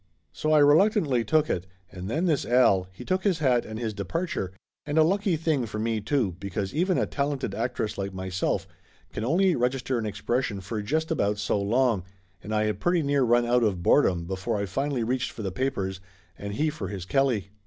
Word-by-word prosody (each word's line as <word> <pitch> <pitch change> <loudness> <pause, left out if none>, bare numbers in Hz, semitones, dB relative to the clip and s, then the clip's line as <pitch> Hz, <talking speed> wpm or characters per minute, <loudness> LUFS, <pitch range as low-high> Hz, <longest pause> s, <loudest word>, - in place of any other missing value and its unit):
So 155 - -2
I 155 - +6
reluctantly 150 - +4
took 155 +7 +2
it 90 - -2 0.2
and 90 +1 -7
then 160 +9 0
this 155 -6 +2
Al, 110 -7 +3
he 95 - -11
took 185 0 0
his 195 -5 +2
hat 130 -6 +2
and 110 - -6
his 110 -2 -3
departure, 105 - -3 0.3
and 145 +1 -3
a 160 - +7
lucky 195 +2 +1
thing 155 -6 0
for 105 - -6
me, 110 0 -1
too, 105 - 0
because 100 0 -4
even 180 +3 +1
a - - +2
talented 140 -6 -2
actress 115 -2 -2
like 100 0 -3
myself 95 0 -2 0.5
can 105 - -3
only 175 +8 +3
register 125 0 0
an 110 - -2
expression 105 +1 -2
for 100 +3 -4
just 160 +10 -1
about 105 -9 +1
so 105 0 0
long, 115 -1 +2 0.4
and 105 - -8
I 105 0 +2
had 105 -2 -1
pretty 175 +2 +2
near 140 -1 +2
run 120 -1 +3
out 120 +1 +3
of 100 -6 0
boredom 90 -11 +3
before 95 +5 -2
I 100 - -1
finally 135 +4 -1
reached 125 +2 -1
for 110 - -8
the 95 - -2
papers 95 -5 -2 0.4
and 100 +2 -6
he 155 +4 +1
for 155 - -5
his 95 -3 -6
Kelly. 125 -5 +1
120 Hz, 205 wpm, -26 LUFS, 100-145 Hz, 0.5 s, a